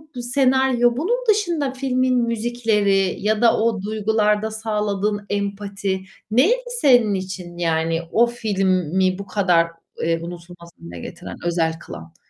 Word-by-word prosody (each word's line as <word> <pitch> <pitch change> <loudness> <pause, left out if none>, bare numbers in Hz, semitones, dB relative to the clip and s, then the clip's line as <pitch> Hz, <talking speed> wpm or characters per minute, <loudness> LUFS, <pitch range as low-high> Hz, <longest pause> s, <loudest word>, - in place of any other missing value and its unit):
bu 245 - -4
senaryo, 255 -1 +2
bunun 400 - +1
dışında 345 -10 +1
filmin 255 -1 0
müzikleri 220 -5 +1
ya 210 +1 0
da 235 -2 +5
o 220 -3 +1
duygularda 215 0 0
sağladığın 210 -2 -2
empati 200 -1 -3 0.3
neydi 410 - +3 0.2
senin 245 -6 +5
için? 185 -2 -5
Yani 165 -1 0
o 235 - +5
filmi 190 -5 0
bu 200 - -6
kadar, 180 -4 +2 0.3
eee, 165 0 0
unutulmaz 170 0 -10
hâle 85 0 -9
getiren - - -8
özel 165 -2 +1
kılan? 85 - -11
210 Hz, 125 wpm, -21 LUFS, 185-240 Hz, 0.3 s, da